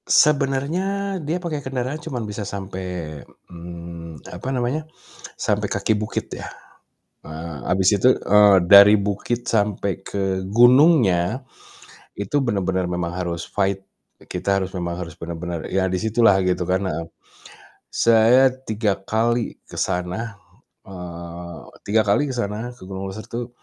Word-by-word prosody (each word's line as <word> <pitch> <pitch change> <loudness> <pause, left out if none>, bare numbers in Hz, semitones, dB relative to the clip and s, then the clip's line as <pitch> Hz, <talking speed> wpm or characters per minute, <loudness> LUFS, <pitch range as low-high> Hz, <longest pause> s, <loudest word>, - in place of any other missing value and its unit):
Sebenarnya 140 +2 +3 0.4
dia 155 +3 -2
pakai 170 -5 -4
kendaraan 130 +2 -3
cuma 130 - -5
bisa 105 0 -5
sampai, 90 -6 -5 0.3
mmm, 85 -2 -9
apa 130 - -5
namanya, 135 +5 -2 0.4
sampai - - -1
kaki 110 - 0
bukit 105 +1 -3
ya. - - -8 0.7
Eee, 80 0 -7
habis 95 0 +3
itu, 125 +6 +5
eee, 105 -1 +5
dari 100 +4 +8
bukit 105 +4 -1
sampai 100 -3 0
ke 95 -1 -2
gunungnya, 120 - +5 0.8
itu 100 +8 0
benar-benar 95 -6 0
memang 90 -1 -2
harus 85 -2 -3
fight. 95 -1 -1 0.3
Kita 95 +2 -2
harus 95 -1 -3
memang 85 -2 -3
harus 85 -3 -6
benar-benar 85 0 -6
ya 95 0 +1
di 95 -1 -1
situlah 110 -3 +4
gitu 90 -1 0
kan, 90 +2 +1
heeh. 80 0 -3 0.8
Saya 115 +3 +5
3 110 -5 -1
kali 115 +4 0
ke - - -18
sana, 90 +5 -2 0.5
eee, 85 -2 -8 0.3
3 110 +2 +2
kali 140 +8 +2
ke - - -3
sana 110 0 -3
ke 95 - -12
Gunung 95 0 -5
Leuser 105 +3 -8
tuh. 120 +1 -5
100 Hz, 135 wpm, -22 LUFS, 90-120 Hz, 0.8 s, dari